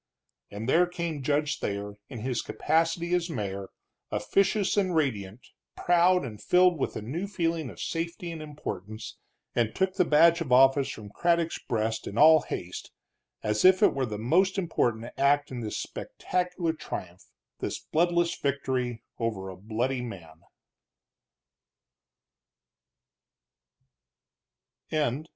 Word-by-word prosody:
And 105 +3 -6
there 175 +6 +4
came 170 -4 -4
Judge 145 +2 0
Thayer, 100 0 -3 0.2
in 120 -5 -7
his 125 0 -1
capacity 165 +2 0
as 175 -1 +1
mayor, 100 - -4 0.4
officious 195 0 +1
and 190 -4 +1
radiant, 115 -7 -2 0.3
proud 175 -1 +3
and 105 -4 -8
filled 180 -2 +4
with - - -2
a - - -4
new 165 - -3
feeling 165 -6 -1
of 95 - -12
safety 170 +1 -3
and 165 -1 -7
importance, 110 -8 -7 0.4
and 115 -2 0
took 190 0 +1
the 190 -1 +3
badge 170 +1 +5
of 145 -6 -4
office 135 +2 +5
from 105 -5 -8
Craddock's 170 +4 +1
breast, 110 -1 -2
in 100 - -6
all 155 +2 +8
haste, 90 0 -6 0.5
as 105 0 0
if 185 0 +6
it - - +6
were 135 -2 -1
the 105 -1 -4
most 180 - +2
important 120 -11 0
act 145 +1 +3
in 125 - -4
this 110 -2 -4
spectacular 180 -2 -2
triumph, 90 - -7 0.3
this - - -3
bloodless 170 +1 +1
victory 130 -4 -2 0.2
over 110 -5 -2
a 95 - -8
bloody 115 +7 -2
man. 85 -9 -9
140 Hz, 130 wpm, -28 LUFS, 110-170 Hz, 0.5 s, all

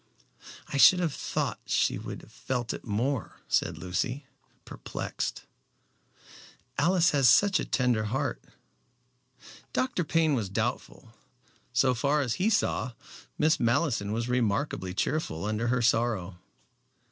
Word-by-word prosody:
"I 140 - -2
should 180 +6 +8
have 170 -5 0
thought - - -2
she - - +1
would - - -7
have - - -16
felt 120 -3 -3
it - - -8
more," 120 +3 -2
said - - 0
Lucy, 120 - -3 0.4
perplexed. - - -5 1.4
"Alice 175 +3 +3
has 135 -4 +4
such 205 -1 +5
a - - -2
tender 125 -4 +1
heart." 120 +6 -2 1.3
Dr. 255 -9 0
Payne 160 -1 +2
was 110 -7 -1
doubtful. 115 +1 -4 0.6
So 130 +1 +3
far 140 +5 +1
as 125 -5 -1
he 205 - +3
saw, 165 - 0 0.4
Miss 155 +1 +3
Malleson 115 -3 +1
was 115 +2 -2
remarkably 110 -5 -1
cheerful 100 - -2
under 110 +2 -1
her 125 0 +1
sorrow. 110 -6 0
125 Hz, 125 wpm, -28 LUFS, 110-145 Hz, 1.4 s, should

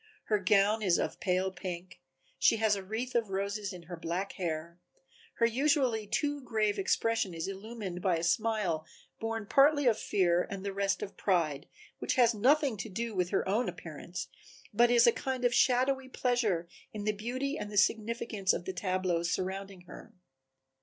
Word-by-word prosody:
Her 210 -1 +3
gown 200 +3 +3
is 185 -5 +3
of - - -2
pale 185 0 0
pink, 180 -1 -7 0.4
she - - +5
has 220 -1 +3
a 200 - -4
wreath 225 +6 -4
of 230 -3 +1
roses 200 +1 -2
in 180 -2 -9
her 175 +1 -7
black 175 +4 -3
hair, 170 -1 -4 0.6
her 230 - +3
usually 250 -3 +1
too 290 +6 -1
grave 215 -4 0
expression 205 -1 0
is 165 +2 -3
illumined 195 -2 -6
by 180 -3 +2
a 165 - -4
smile 210 -5 +1 0.4
born 225 -1 -3
partly 290 +4 +4
of 230 -3 +3
fear 175 -2 +1
and 195 0 -6
the 200 - -2
rest 195 0 0
of 195 - -8
pride, 160 -7 0 0.3
which - - -1
has 240 -3 +5
nothing 265 +3 +3
to 220 - -5
do 230 +4 -3
with 180 -2 0
her 195 - 0
own 215 +6 +1
appearance, - - -7 0.5
but 240 +3 +5
is 240 -1 +6
a 235 - +7
kind 260 0 -3
of 245 - +3
shadowy 260 +2 +2
pleasure 230 -10 0 0.2
in 210 -1 -6
the 215 - +2
beauty 250 +7 -3
and 210 -8 -5
the 205 - -4
significance 215 -2 +1
of 175 - -4
the 190 - -3
tableau 185 -2 0
surrounding 190 +2 -3
her. 175 - -13
205 Hz, 180 wpm, -31 LUFS, 185-235 Hz, 0.6 s, a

